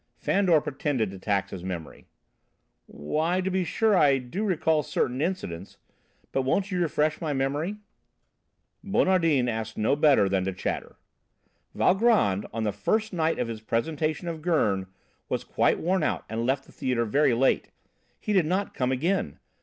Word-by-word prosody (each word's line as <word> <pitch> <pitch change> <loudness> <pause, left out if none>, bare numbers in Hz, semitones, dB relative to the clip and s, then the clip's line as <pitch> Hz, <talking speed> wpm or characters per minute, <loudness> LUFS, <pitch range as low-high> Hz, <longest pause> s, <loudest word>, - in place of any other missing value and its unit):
Fandor 185 -5 +3
pretended 135 -7 -2
to 95 - -9
tax 100 -1 -1
his 90 -2 -7
memory. 90 -4 -7 0.8
"Why, 155 - -1
to 190 +1 -1
be 185 0 +1
sure 220 +4 +2
I 145 -6 +5
do 130 - -4
recall 160 -6 +2
certain 130 -2 -1
incidents, 125 - -4 0.5
but 135 - +1
won't 190 +10 0
you 180 -1 0
refresh 155 -2 0
my 155 -3 -1
memory?" 145 +8 -1 1.1
Bonardin 165 -9 +2
asked 110 -1 -3
no 110 +6 +2
better 145 -8 +4
than 95 -1 0
to 95 - -2
chatter. 90 - -4 0.8
"Valgrand, 190 - +3
on 115 0 -3
the 105 - 0
first 215 - -1
night 165 -2 +1
of 125 - -1
his 115 -2 -6
presentation 155 +9 -2
of 165 -2 -4
Gurn,[B] 105 - +1 0.4
was - - -1
quite - - +1
worn 185 +2 +1
out - - -1
and 115 +2 -2
left 135 +1 0
the - - -18
theatre 125 -2 -1
very 130 +2 +2
late. 130 +3 +2 0.5
He 210 - -2
did 185 -6 +3
not 190 +4 -1
come 125 0 -1
again! 135 - -1
145 Hz, 160 wpm, -26 LUFS, 110-180 Hz, 1.1 s, I